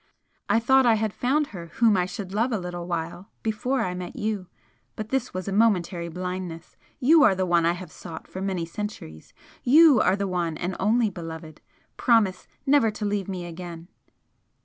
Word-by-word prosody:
I 225 - +4
thought 265 +2 +4
I 230 - +5
had 215 -1 -1
found 285 +4 +1
her 170 -3 -7
whom 225 -3 +4
I 180 -1 +1
should 190 0 -7
love 230 +5 +1
a 225 - +1
little 175 -2 -6
while 170 +2 -4
before 235 +5 -1
I 180 - -2
met 180 -1 -6
you 210 -3 -3 0.5
but 215 0 -6
this 260 -1 -1
was 185 +1 -5
a - - -2
momentary 185 -5 +1
blindness! 180 -1 -6 0.2
YOU 310 +5 +6
are 195 - +6
the 185 0 0
one 170 -2 +3
I 170 - +3
have 180 +1 -9
sought 165 -2 -9
for 190 - -7
many 190 -3 -2
centuries! 165 - -7 0.3
YOU 295 0 +7
are 185 - +3
the 200 0 -2
one 175 -4 -2
and 180 +3 -3
only 220 +1 +2
beloved! 160 -3 -8 0.4
promise 215 -7 +2 0.2
never 275 -5 +4
to 210 0 -5
leave 205 -2 -1
me 180 -2 -4
again!" 170 0 -8
190 Hz, 190 wpm, -25 LUFS, 175-225 Hz, 0.5 s, YOU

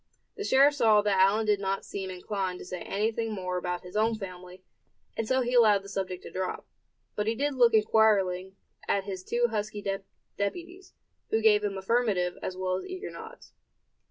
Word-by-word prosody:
The 415 - -5
sheriff 280 -5 +5
saw 220 -6 +4
that 200 -2 +2
Allan 200 +4 +4
did 210 -1 +2
not 195 0 -2
seem 195 -1 -5
inclined 185 0 -3
to - - -10
say 180 -1 -6
anything 220 +2 -1
more 185 -2 -3
about 180 0 -3
his 180 +2 -11
own 220 +1 +2
family; 185 -2 -9 0.5
and 225 - -2
so 260 +2 +2
he 245 0 -2
allowed 215 -5 +5
the 200 - -10
subject 190 -2 -4
to - - -9
drop. 185 0 -4 0.5
But 210 0 -1
he 225 - +1
did 285 +4 0
look 240 -3 +4
inquiringly 195 -4 +3 0.3
at 200 - +1
his 190 -2 -6
two 240 +4 +1
husky 210 -1 -3 0.5
deputies, 350 - -5 0.3
who 220 - +2
gave 215 -1 +4
him 200 -1 -2
affirmative 190 -3 +1
as 185 - -5
well 185 0 -1
as - - -7
eager 370 +1 -6
nods. - - -11
205 Hz, 185 wpm, -28 LUFS, 185-225 Hz, 0.5 s, sheriff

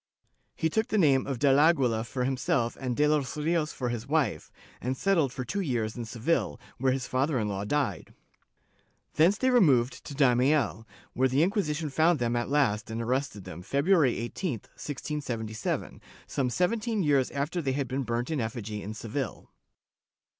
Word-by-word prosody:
He 160 - 0
took 220 +7 0
the 215 - 0
name 140 -8 +4
of 135 -3 -2
del 140 +1 +4
Aguila 135 -8 +3
for 125 +3 -3
himself 125 -2 0
and 125 -2 -2
de 150 - +4
los 150 -2 0
Rios 155 0 0
for 125 -2 -3
his 120 -2 -4
wife, 135 - 0 0.3
and 130 +2 -2
settled 165 -8 +2
for 125 0 -5
two 200 +11 -2
years 120 - -1
in 120 -2 -5
Seville, 120 +4 -1 0.2
where 130 +1 +2
his 130 0 -1
father 135 +3 0
in 110 -3 0
law 100 -1 -3
died. 145 +3 -1 1.0
Thence 175 +6 +4
they 260 +2 +2
removed 135 - +3
to 140 - -7
Daimiel, 130 -3 +2 0.3
where 130 +1 +2
the 135 +4 +2
Inquisition 165 -6 -1
found 160 +4 +3
them 120 -2 0
at 120 +1 -1
last 115 -8 +1
and 110 +1 -4
arrested 125 -3 -2
them, 85 +1 -8
Feb 140 +9 -1
ruary 165 -8 +4
18, 135 +8 -3
1677, 120 -2 -4 0.2
some 130 -3 -1
seventeen 215 - 0
years 140 -4 +3
after 145 +5 -2
they 135 -4 -1
had 135 -1 -1
been 130 +2 -2
burnt 120 +3 -2
in 150 -5 0
effigy 110 -2 -4
in 105 +2 -6
Seville. 115 +5 -5
135 Hz, 175 wpm, -28 LUFS, 120-155 Hz, 1.0 s, name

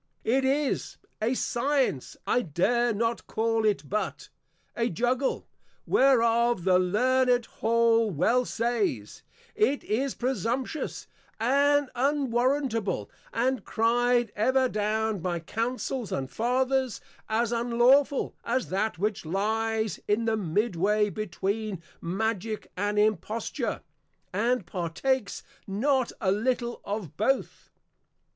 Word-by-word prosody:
It 265 +4 +2
is 275 +1 0 0.2
(a 235 +4 +1
Science, 255 - 0
I 245 - +2
dare 235 - +1
not 230 +2 -1
call 225 0 0
it, 205 -8 +1
but) 210 +5 -3 0.5
a 235 0 0
Juggle, 245 - 0 0.4
whereof 235 -5 +3
the 185 0 +4
Learned 245 +6 +2
Hall 230 0 +2
well 210 - +2
says, 225 - -2 0.3
_It 265 +7 +1
is 260 +5 -1
presumptuous 255 - -2 0.3
and 280 +4 +3
unwarrantable, 255 -4 0 0.2
and 255 +2 0
cry'd 240 0 +2
ever 260 +5 +3
down 215 -1 -1
by 175 0 -2
Councils 235 +5 -3
and 135 -1 -3
Fathers, 255 +1 0 0.3
as 225 +1 +1
unlawful, 240 +4 +3
as 250 +2 -1
that 200 +2 -1
which 210 +3 -1
lies 220 +5 -1
in 210 +2 +1
the 225 -1 +2
mid 205 +2 0
way 210 +4 +2
between 205 0 -3 0.2
Magick 215 +3 -2
and 205 +2 -1
Imposture, 215 +1 -1 0.5
and 230 +1 +1
partakes 195 +7 -2 0.2
not 255 +6 +1
a 190 -3 +1
little 240 +3 -1
of 200 -7 -4
both. 265 +6 -1
230 Hz, 110 wpm, -27 LUFS, 210-250 Hz, 0.5 s, the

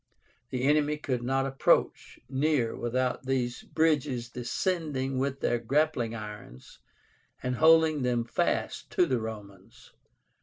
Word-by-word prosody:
The 130 -1 -3
enemy 150 +1 +2
could 130 -5 -2
not 135 +2 0
approach 135 0 +1
near 135 -3 0
without 125 +2 -2
these 125 -2 -1
bridges 145 -7 0
descending 135 0 -2
with 135 0 -2
their 120 - +1
grappling 120 -2 0
irons 105 - -10 0.6
and 125 -1 -1
holding 160 -1 +5
them 125 -2 +1
fast - - -1
to 180 - +4
the 130 -7 0
Romans. 100 -4 -10
130 Hz, 120 wpm, -28 LUFS, 120-150 Hz, 0.6 s, holding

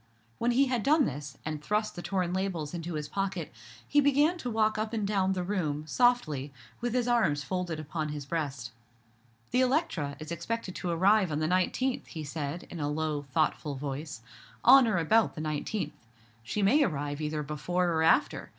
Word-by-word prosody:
When 235 - +1
he 260 +3 +4
had 250 -3 0
done 295 +3 +4
this, 140 0 -5
and 155 -1 -3
thrust 210 +4 0
the 175 - -5
torn 180 -2 -1
labels 185 -5 -2
into 170 -1 -4
his 150 -1 -3
pocket, 195 -1 -3 0.4
he 290 - +4
began 290 +4 +3
to 250 - -3
walk 215 -1 +1
up 215 +1 -2
and 215 -3 -1
down 195 -2 +1
the 180 -1 -2
room, 155 -6 -2
softly, 155 - +1 0.3
with 240 0 -2
his 245 -1 +1
arms 220 -12 +2
folded 180 -2 -3
upon 155 0 -3
his 150 -2 -5
breast. 140 -6 -3 0.8
"The 250 - +3
Electra, 250 - 0
is 155 +1 -8
expected 185 +4 -3
to 180 - -3
arrive 190 +2 +3
on 150 - -1
the 155 - 0
nineteenth," 185 +9 0
he 160 -3 -6
said, 150 +2 -4
in 175 - -6
a 145 -1 -1
low, 150 -1 -2
thoughtful 150 -1 0
voice, 140 -1 -5 0.4
"on 260 0 +8
or 220 - +1
about 215 +7 +3
the 155 - -5
nineteenth. 155 +3 -2 0.5
She 165 - -2
may 260 +10 +5
arrive 145 - -2
either 150 0 -2
before 175 +5 -1
or 160 - +1
after. 165 - +2
175 Hz, 185 wpm, -29 LUFS, 150-220 Hz, 0.8 s, on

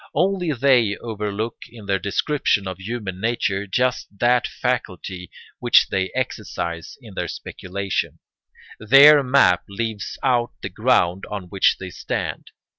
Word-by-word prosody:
Only 185 -3 +1
they 125 -6 +3
overlook 110 0 -4
in 115 -3 -13
their 100 -1 0
description 100 -1 0
of 95 -1 -6
human 95 -2 -5
nature 105 -3 -1
just 125 +6 0
that 120 +3 +3
faculty 95 -7 -4 0.3
which - - +4
they 95 -1 -1
exercise 100 -9 -4
in - - -12
their - - -3
speculation; 100 +1 -4 0.6
their 140 +6 +8
map 125 -10 +4
leaves 110 0 -4
out 120 -3 +1
the - - -3
ground 90 +3 +1
on 100 -4 -6
which 95 0 +3
they 95 -1 -7
stand. - - -4
105 Hz, 130 wpm, -22 LUFS, 95-125 Hz, 0.6 s, their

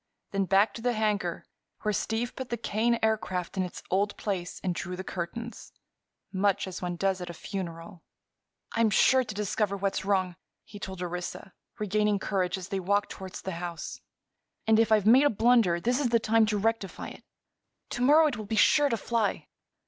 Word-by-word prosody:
Then 195 -1 +1
back 195 +3 +3
to 230 - -7
the 245 +1 +1
hangar, 210 -6 -1 0.4
where 210 - +1
Steve 225 +4 -2
put 260 -1 -6
the 235 - -2
Kane 230 +1 +1
Aircraft 205 -5 0
in 190 - 0
its 180 -1 -5
old 200 +2 +1
place 185 -4 -3
and 185 -2 0
drew 180 +1 -4
the 190 - -5
curtains—much 200 0 -4
as 185 -1 -6
one 175 -1 -2
does 190 +1 0
at 175 - -5
a 170 - -7
funeral. 170 -2 -6 0.7
"I'm 230 -1 +3
sure 260 +5 +5
to 215 -4 -7
discover 205 0 -1
what's 195 0 -1
wrong," 190 -3 0 0.3
he 205 - -11
told 190 -2 -6
Orissa, 180 +2 -5 0.2
regaining 210 0 +1
courage 190 -2 -1
as 190 -1 -8
they 195 - -1
walked 200 +3 0
toward 190 -1 -8
the 190 - -5
house. 170 -2 -6 0.6
"And, 220 0 +4
if 225 -1 +3
I've 215 -2 +4
made 255 +6 +7
a - - +6
blunder, 225 -6 +3
this 245 +8 +1
is 270 -4 +1
the 230 0 +3
time 220 0 +3
to 210 0 0
rectify 220 -2 -1
it. - - -13 0.7
To 245 - -3
morrow 300 +5 +6
it 290 -7 0
will 215 - -6
be 220 - -1
sure 290 +7 +5
to 230 - 0
fly. 230 -2 -1
205 Hz, 190 wpm, -28 LUFS, 185-225 Hz, 0.7 s, made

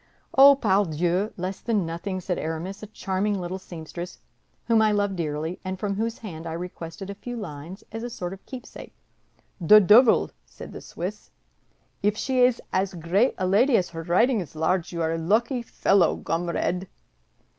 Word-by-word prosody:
"Oh, 275 +1 +9
pardieu, 190 - +1
less 185 +2 -4
than 215 -6 0
nothing," 170 +4 -4
said 180 0 -2
Aramis; 165 +5 -4
"a 215 - -7
charming 200 0 -2
little 180 +1 -4
seamstress, 175 0 -8 0.5
whom 230 -2 +4
I 215 -1 +4
love 205 -1 0
dearly 160 +1 -3
and 185 0 -4
from 200 0 -1
whose 225 +3 -2
hand 170 -6 -8
I 160 - -4
requested 175 +2 -7
a - - -5
few 240 +4 -7
lines 170 -1 -8
as 225 0 -5
a 240 - -4
sort 180 -5 -5
of 195 - -12
keepsake." 255 -2 -10 0.6
"The 200 +5 +8
duvil!" 220 +4 +6
said - - -11
the - - -8
Swiss, - - -6 0.7
"if 210 +1 +1
she 260 +1 0
is 250 -1 +4
as 190 0 0
great 180 +9 +1
a 185 - -1
lady 230 +8 +4
as 180 - 0
her 165 -1 -6
writing 210 +8 +2
is 160 -3 -9
large, 165 +2 0
you 170 -1 -2
are 160 0 0
a 165 - -2
lucky 235 - +1
fellow, 195 -6 +2
gomrade!" 175 +3 -2
190 Hz, 175 wpm, -25 LUFS, 170-215 Hz, 0.7 s, Oh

